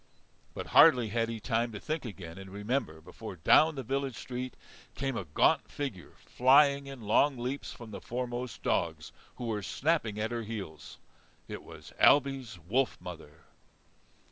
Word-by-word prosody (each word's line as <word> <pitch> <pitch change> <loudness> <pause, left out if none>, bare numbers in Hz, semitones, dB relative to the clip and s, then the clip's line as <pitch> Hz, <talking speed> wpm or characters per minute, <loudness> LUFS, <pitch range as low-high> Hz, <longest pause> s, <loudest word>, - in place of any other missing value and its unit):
But - - -4
hardly 120 -3 +7
had 115 +1 0
he 115 -1 -4
time 115 +1 0
to 105 - -6
think 155 -2 -3
again 95 -5 -8
and 95 0 -9
remember 100 - -2
before 85 - -9
down 155 - +5
the 135 - -4
village 135 +1 -2
street 125 0 -5 0.4
came 135 -2 -2
a 95 - -3
gaunt 75 - +2
figure, 130 - -5
flying 140 +2 +4
in 135 -3 -8
long 130 +6 +3
leaps 125 +4 -4
from 115 -2 -10
the - - -7
foremost 125 0 -4
dogs - - -1 0.2
who 125 - -6
were 110 -3 -2
snapping 125 - 0
at 110 +2 -1
her 120 -1 -2
heels. 100 -9 -7 0.5
It - - -6
was - - -13
Ailbe's 135 -7 +4
wolf 110 - 0
mother. 80 -2 -10
120 Hz, 160 wpm, -30 LUFS, 105-135 Hz, 0.5 s, hardly